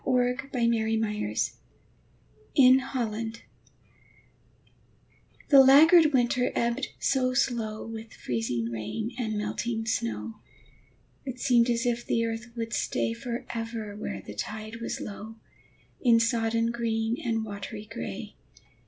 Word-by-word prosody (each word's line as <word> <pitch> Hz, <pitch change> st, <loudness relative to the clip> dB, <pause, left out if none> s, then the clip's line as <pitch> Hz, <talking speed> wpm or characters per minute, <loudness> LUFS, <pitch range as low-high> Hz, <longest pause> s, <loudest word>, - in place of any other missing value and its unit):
FLOOD 250 Hz, +1 st, +1 dB
TIDE 235 Hz, -2 st, +2 dB
OF 220 Hz, 0 st, +1 dB
FLOWERS 210 Hz, -, -1 dB, 1.0 s
IN 260 Hz, -1 st, +7 dB
HOLLAND 230 Hz, -4 st, -4 dB, 2.1 s
The 280 Hz, -, +8 dB
laggard 305 Hz, +4 st, +7 dB
winter 250 Hz, -1 st, +2 dB
ebbed 235 Hz, +3 st, 0 dB
so 255 Hz, -2 st, +1 dB
slow 225 Hz, -5 st, 0 dB
With 225 Hz, 0 st, -8 dB
freezing 115 Hz, -1 st, -2 dB
rain 115 Hz, -, -4 dB
and 220 Hz, -3 st, -1 dB
melting 225 Hz, +2 st, -2 dB
snow, 110 Hz, -, -2 dB, 0.8 s
It 255 Hz, -2 st, -6 dB
seemed 245 Hz, -2 st, +4 dB
as 235 Hz, +1 st, +1 dB
if 240 Hz, 0 st, 0 dB
the 230 Hz, 0 st, 0 dB
earth 225 Hz, +1 st, -4 dB
would 230 Hz, 0 st, -4 dB
stay 225 Hz, -, 0 dB
Forever 230 Hz, -3 st, -5 dB
where 210 Hz, -, -5 dB
the -, -, -8 dB
tide 215 Hz, +1 st, -5 dB
was -, -, -3 dB
low, 215 Hz, +2 st, -7 dB, 0.7 s
In 235 Hz, -3 st, +5 dB
sodden 230 Hz, 0 st, +1 dB
green 230 Hz, -1 st, -1 dB
and 225 Hz, -3 st, -1 dB
watery 205 Hz, +1 st, -7 dB
gray. 220 Hz, +2 st, -6 dB
230 Hz, 120 wpm, -28 LUFS, 220-245 Hz, 2.1 s, The